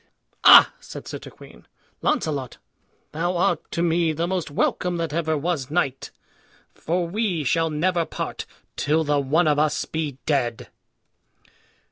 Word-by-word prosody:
"Ah!" - - +9
said - - -10
Sir - - -6
Turquine, - - -14 0.3
"Launcelot, 150 - -1 0.5
thou 175 +3 -1
art 180 -2 +2
to 170 - -2
me 165 -1 +1
the 165 +2 -1
most 180 -2 -2
welcome 175 +4 -1
that 165 -3 -3
ever 160 -1 0
was 150 -3 -2
knight; 145 -5 -1 0.6
for 175 +1 -2
we 190 -4 -1
shall 165 +4 +1
never 170 +3 0
part - - -5 0.3
till 155 +2 +1
the 145 -1 +1
one 155 +5 +2
of 150 -1 +2
us 155 0 +1
be 155 -4 -4
dead." 125 -6 -1
160 Hz, 140 wpm, -23 LUFS, 150-175 Hz, 0.6 s, Ah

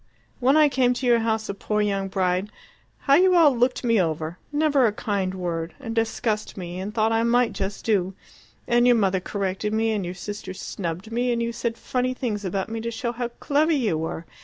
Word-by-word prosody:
when 265 +4 +4
I 305 -1 +7
came 255 -3 +2
to 255 - -3
your 240 -1 +4
house 220 -1 -1
a - - -3
poor 210 +1 -2
young 200 -2 0
bride, 190 0 0 0.5
how 275 - +3
you 365 +4 +5
all 310 -6 +6
looked 245 +2 +1
me 230 -4 +3
over 160 0 -3
never 290 -4 +3
a - - +1
kind 200 -3 -2
word 170 -2 -3
and 230 -5 -5
discussed 220 -1 -1
me, 180 -1 -6
and 195 +3 -4
thought 220 0 +1
I 225 0 +2
might 235 0 +2
just 195 +1 -4
do; 195 -4 +1 0.5
and 240 +1 +4
your 245 - +6
mother 195 -4 +2
corrected 195 +2 -3
me, 225 0 +1
and 210 -3 -1
your 175 +1 -5
sister 205 +1 -7
snubbed 185 +3 -5
me, 245 +2 0
and 235 - 0
you 235 0 -2
said 230 0 -3
funny 255 0 -1
things 220 -6 -3
about 190 0 -2
me 225 0 -4
to 235 - -3
show 235 +1 -3
how 240 0 -3
clever 290 +6 +1
you 235 - +1
were! 160 +1 -4
220 Hz, 215 wpm, -24 LUFS, 190-245 Hz, 0.5 s, I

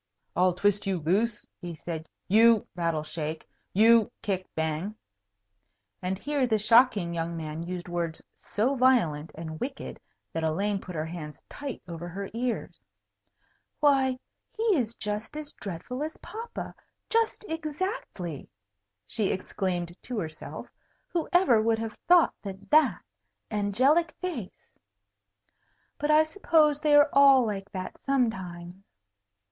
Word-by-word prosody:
"I'll 180 0 +3
twist 205 +2 +1
you 190 -2 +1
loose," 205 +8 0 0.2
he 175 -2 -6
said, 160 -1 -6 0.2
"you 225 +2 +6
(rattle, 165 -3 0
shake) 155 0 -5 0.2
you 225 +2 +5
(kick, 190 -2 -2
bang) 160 +6 -2 0.6
" 100 0 -50
And 185 +1 -2
here 285 +3 0
the 220 -2 +2
shocking 215 -4 +4
young 165 0 -2
man 155 0 -5
used 175 +1 -5
words 170 -2 -2 0.4
so 235 +7 +3
violent 230 - +3
and 160 -1 -6
wicked 270 +1 -5 0.3
that 165 - -2
Elaine 195 +5 0
put 180 - -8
her 155 0 -1
hands 160 -2 -8
tight 280 -4 -6
over 170 0 -6
her 195 +3 -6
ears. 240 +1 -3 1.0
"Why, 270 -3 +3 0.3
he 440 - -4
is 235 -6 -1
just 210 +6 -4
as 300 -1 -6
dreadful 200 - -6
as 310 +1 -4
papa, 455 +2 -7 0.4
just 455 -1 +1
exactly!" 310 - -4 0.6
she 200 - -1
exclaimed 180 -2 -2
to 250 - -5
herself. 160 -6 -5 0.4
"Whoever 340 - +3
would 225 0 +2
have 225 -1 -4
thought 350 -1 +6
that 195 +2 -9
that 310 +1 +4 0.5
angelic 255 - +2
face 310 - -6 1.3
but 295 - -1
I 305 +1 +7
suppose 315 -4 +3
they 300 -1 +4
are 290 0 +7
all 275 -2 +7
like 200 -2 -4
that 185 -1 -5
sometimes." 190 -9 -2
205 Hz, 130 wpm, -28 LUFS, 175-270 Hz, 1.3 s, I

